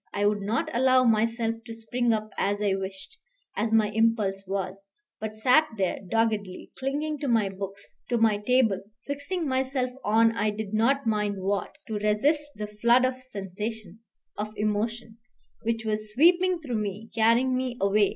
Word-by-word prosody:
I 205 Hz, 0 st, +1 dB
would 205 Hz, 0 st, +2 dB
not 215 Hz, +4 st, -1 dB
allow 255 Hz, +1 st, +5 dB
myself 230 Hz, 0 st, +1 dB
to 225 Hz, 0 st, -8 dB
spring 235 Hz, +2 st, -1 dB
up 215 Hz, -1 st, -1 dB
as 205 Hz, +1 st, 0 dB
I 205 Hz, -2 st, +1 dB
wished, 195 Hz, -, -6 dB, 0.4 s
as 220 Hz, +1 st, -1 dB
my 220 Hz, -2 st, +4 dB
impulse 210 Hz, -3 st, +1 dB
was, 195 Hz, 0 st, -3 dB, 0.4 s
but 215 Hz, 0 st, -5 dB
sat 255 Hz, +8 st, +4 dB
there 190 Hz, -2 st, 0 dB
doggedly, 205 Hz, -2 st, -1 dB
clinging 290 Hz, +3 st, -2 dB
to 285 Hz, -, -3 dB
my 225 Hz, -5 st, +2 dB
books, 195 Hz, +1 st, -8 dB
to 240 Hz, -, +2 dB
my 220 Hz, -2 st, +3 dB
table, 220 Hz, -3 st, +2 dB, 0.2 s
fixing 285 Hz, +4 st, -3 dB
myself 260 Hz, -1 st, 0 dB
on 225 Hz, +2 st, +3 dB
I 215 Hz, -1 st, +1 dB
did 210 Hz, 0 st, -5 dB
not 260 Hz, +6 st, +2 dB
mind 210 Hz, -3 st, 0 dB
what, 200 Hz, -1 st, -1 dB
to 215 Hz, -2 st, -3 dB
resist 285 Hz, +9 st, +2 dB
the 210 Hz, -, -4 dB, 0.2 s
flood 240 Hz, +2 st, +5 dB
of 255 Hz, 0 st, -1 dB
sensation, 210 Hz, -3 st, -6 dB, 0.4 s
of 210 Hz, -, -3 dB
emotion, 220 Hz, +2 st, -2 dB, 0.4 s
which 225 Hz, 0 st, -2 dB
was 215 Hz, 0 st, -1 dB
sweeping 350 Hz, +7 st, +4 dB
through 245 Hz, -7 st, -2 dB
me, 210 Hz, +2 st, -5 dB
carrying 235 Hz, +3 st, +3 dB
me 255 Hz, -1 st, -2 dB
away. 200 Hz, +1 st, +3 dB
225 Hz, 165 wpm, -27 LUFS, 205-250 Hz, 0.4 s, allow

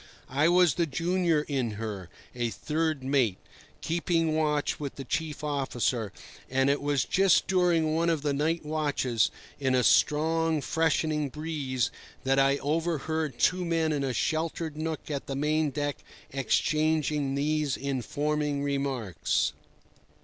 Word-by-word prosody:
I 145 Hz, +5 st, +3 dB
was 180 Hz, -2 st, +5 dB
the 170 Hz, -2 st, 0 dB
junior 170 Hz, +1 st, +1 dB
in 130 Hz, -6 st, -1 dB
her, 105 Hz, -4 st, -5 dB, 0.2 s
a 120 Hz, -1 st, -1 dB
third 155 Hz, +5 st, -2 dB
mate, 130 Hz, -8 st, +2 dB, 0.4 s
keeping 165 Hz, -1 st, 0 dB
watch 150 Hz, -2 st, 0 dB
with 145 Hz, -2 st, -5 dB
the 135 Hz, -, -6 dB
chief 150 Hz, +2 st, -3 dB
officer; 130 Hz, -6 st, -1 dB, 0.4 s
and 135 Hz, +1 st, +3 dB
it 140 Hz, -, 0 dB
was 145 Hz, -3 st, +1 dB
just 195 Hz, 0 st, +4 dB
during 175 Hz, -4 st, +2 dB
one 165 Hz, +1 st, +2 dB
of 160 Hz, -3 st, 0 dB
the 145 Hz, -1 st, +1 dB
night 160 Hz, +3 st, 0 dB
watches 145 Hz, -7 st, +1 dB, 0.3 s
in 130 Hz, -2 st, +1 dB
a 125 Hz, -, +3 dB
strong, 160 Hz, +3 st, +3 dB
freshening 155 Hz, -1 st, 0 dB
breeze 140 Hz, -5 st, -2 dB, 0.3 s
that 135 Hz, +1 st, +2 dB
I 135 Hz, +1 st, +4 dB
overheard 160 Hz, -2 st, -1 dB
two 180 Hz, 0 st, +2 dB
men 165 Hz, -2 st, +1 dB
in 145 Hz, -2 st, 0 dB
a 135 Hz, -, 0 dB
sheltered 160 Hz, +4 st, -1 dB
nook 155 Hz, 0 st, -4 dB
of 140 Hz, -2 st, -4 dB
the 135 Hz, -, -3 dB
main 150 Hz, +2 st, +1 dB
deck 145 Hz, +1 st, -2 dB, 0.3 s
exchanging 150 Hz, +1 st, +1 dB
these 150 Hz, -1 st, 0 dB
informing 145 Hz, +2 st, -1 dB
remarks. 135 Hz, -8 st, -1 dB
150 Hz, 140 wpm, -28 LUFS, 135-160 Hz, 0.4 s, was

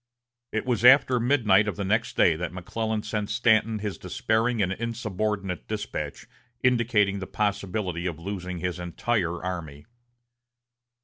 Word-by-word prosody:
It 110 Hz, -, -2 dB
was 120 Hz, -3 st, 0 dB
after 130 Hz, 0 st, +7 dB
midnight 110 Hz, -5 st, +3 dB
of 105 Hz, -, -2 dB
the 100 Hz, -, -3 dB
next 110 Hz, +4 st, 0 dB
day 85 Hz, -, +5 dB
that 85 Hz, +2 st, -4 dB
McClellan 110 Hz, +4 st, -3 dB
sent 105 Hz, -2 st, -3 dB
Stanton 110 Hz, 0 st, +3 dB
his 105 Hz, -2 st, -4 dB
despairing 110 Hz, +5 st, 0 dB
and 95 Hz, -2 st, +1 dB
insubordinate 105 Hz, -3 st, -3 dB
despatch 100 Hz, -9 st, -4 dB, 0.4 s
indicating 115 Hz, -5 st, +2 dB
the 95 Hz, -, -6 dB
possibility 95 Hz, -3 st, -2 dB
of 85 Hz, -, -4 dB
losing 90 Hz, 0 st, -5 dB
his 90 Hz, 0 st, -3 dB
entire 90 Hz, 0 st, -1 dB
army. 80 Hz, -6 st, -5 dB
105 Hz, 135 wpm, -26 LUFS, 90-110 Hz, 0.4 s, after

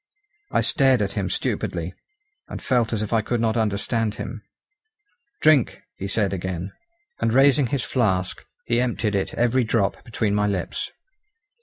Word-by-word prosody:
I -, -, +3 dB
stared 130 Hz, -5 st, +3 dB
at, 100 Hz, -, -2 dB
him 100 Hz, -3 st, -2 dB
stupidly, 85 Hz, 0 st, -2 dB, 0.5 s
and -, -, -6 dB
felt 120 Hz, -3 st, +1 dB
as 110 Hz, -2 st, -1 dB
if 105 Hz, -, -4 dB
I 110 Hz, -, +4 dB
could 120 Hz, +2 st, -1 dB
not 110 Hz, 0 st, +1 dB
understand 110 Hz, 0 st, 0 dB
him. 115 Hz, -3 st, -6 dB, 1.0 s
"Drink!" 150 Hz, -6 st, +4 dB
he 95 Hz, -, -5 dB
said 100 Hz, -1 st, 0 dB
again. 95 Hz, 0 st, -4 dB, 0.5 s
And 115 Hz, -, +1 dB
raising 135 Hz, +1 st, +5 dB
his 130 Hz, +1 st, -1 dB
flask 95 Hz, -8 st, 0 dB, 0.2 s
he 120 Hz, +1 st, +2 dB
emptied 115 Hz, -3 st, 0 dB
it 100 Hz, -1 st, 0 dB
every 120 Hz, +2 st, +2 dB
drop 110 Hz, -3 st, 0 dB
between 110 Hz, -4 st, -1 dB
my 105 Hz, 0 st, +2 dB
lips. 95 Hz, -4 st, -2 dB
110 Hz, 155 wpm, -23 LUFS, 100-120 Hz, 1.0 s, raising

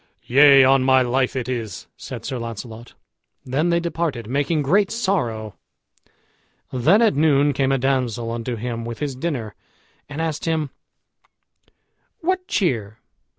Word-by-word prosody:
"Yea, 140 Hz, +1 st, +7 dB
on 135 Hz, +1 st, +5 dB
my 130 Hz, 0 st, +4 dB
life 130 Hz, +2 st, 0 dB
it 125 Hz, -2 st, -3 dB
is," 115 Hz, -4 st, -4 dB
said -, -, -8 dB
Sir 130 Hz, -, -3 dB
Launcelot. 115 Hz, 0 st, -8 dB, 0.5 s
Then 145 Hz, +7 st, 0 dB
they 170 Hz, 0 st, +2 dB
departed, 165 Hz, -8 st, -3 dB
making 145 Hz, +4 st, 0 dB
great 195 Hz, +8 st, +3 dB
sorrow. 125 Hz, -, -2 dB, 1.2 s
Then 165 Hz, -, +4 dB
at 220 Hz, -, +4 dB
noon 145 Hz, -1 st, +3 dB
came 135 Hz, 0 st, +1 dB
a 135 Hz, -, +2 dB
damsel 125 Hz, -3 st, -1 dB
unto 120 Hz, +1 st, -3 dB
him 115 Hz, 0 st, -4 dB
with 115 Hz, 0 st, -6 dB
his 145 Hz, -3 st, -3 dB
dinner, 130 Hz, -8 st, -3 dB, 0.6 s
and 145 Hz, +2 st, -6 dB
asked 160 Hz, -2 st, -2 dB
him, 160 Hz, -4 st, -1 dB, 1.5 s
"What 365 Hz, +2 st, -1 dB
cheer?" 110 Hz, -, -1 dB
135 Hz, 140 wpm, -22 LUFS, 120-160 Hz, 1.5 s, Yea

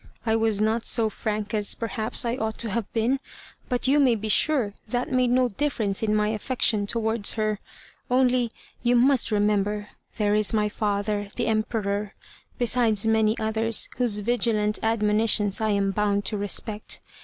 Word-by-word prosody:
"I 220 Hz, -1 st, +2 dB
was 225 Hz, -2 st, +1 dB
not 220 Hz, +2 st, +1 dB
so 220 Hz, -2 st, +3 dB
frank 210 Hz, -1 st, -3 dB
as, 210 Hz, -2 st, +1 dB
perhaps, 225 Hz, 0 st, -2 dB
I 235 Hz, +1 st, 0 dB
ought 220 Hz, -3 st, -3 dB
to 230 Hz, -3 st, -3 dB
have 225 Hz, 0 st, -3 dB
been; 240 Hz, +4 st, 0 dB, 0.5 s
but 250 Hz, 0 st, 0 dB
you 285 Hz, +2 st, +4 dB
may 260 Hz, -5 st, +4 dB
be 215 Hz, 0 st, -4 dB
sure 245 Hz, -2 st, +2 dB
that 245 Hz, +4 st, -2 dB
made 255 Hz, -1 st, +2 dB
no 250 Hz, 0 st, +3 dB
difference 220 Hz, -5 st, -1 dB
in 215 Hz, -1 st, +1 dB
my 210 Hz, 0 st, +1 dB
affection 215 Hz, -2 st, 0 dB
towards 220 Hz, -1 st, 0 dB
her. 215 Hz, -2 st, -1 dB, 0.5 s
Only, 250 Hz, -1 st, +2 dB, 0.3 s
you 245 Hz, 0 st, +2 dB
must 255 Hz, +1 st, +3 dB
remember, 210 Hz, 0 st, 0 dB, 0.3 s
there 210 Hz, -2 st, +1 dB
is 215 Hz, 0 st, +2 dB
my 210 Hz, -1 st, +1 dB
father, 205 Hz, -1 st, -2 dB
the 240 Hz, -, -1 dB
Emperor, 215 Hz, -2 st, -1 dB, 0.4 s
besides 230 Hz, -4 st, +1 dB
many 220 Hz, 0 st, +2 dB
others, 220 Hz, +1 st, 0 dB
whose 240 Hz, -4 st, +1 dB
vigilant 215 Hz, -2 st, 0 dB
admonitions 210 Hz, -2 st, +2 dB
I 220 Hz, -, +1 dB
am 200 Hz, -1 st, +1 dB
bound 205 Hz, 0 st, 0 dB
to 215 Hz, -, 0 dB
respect. 210 Hz, +1 st, -2 dB
220 Hz, 165 wpm, -25 LUFS, 210-235 Hz, 0.5 s, you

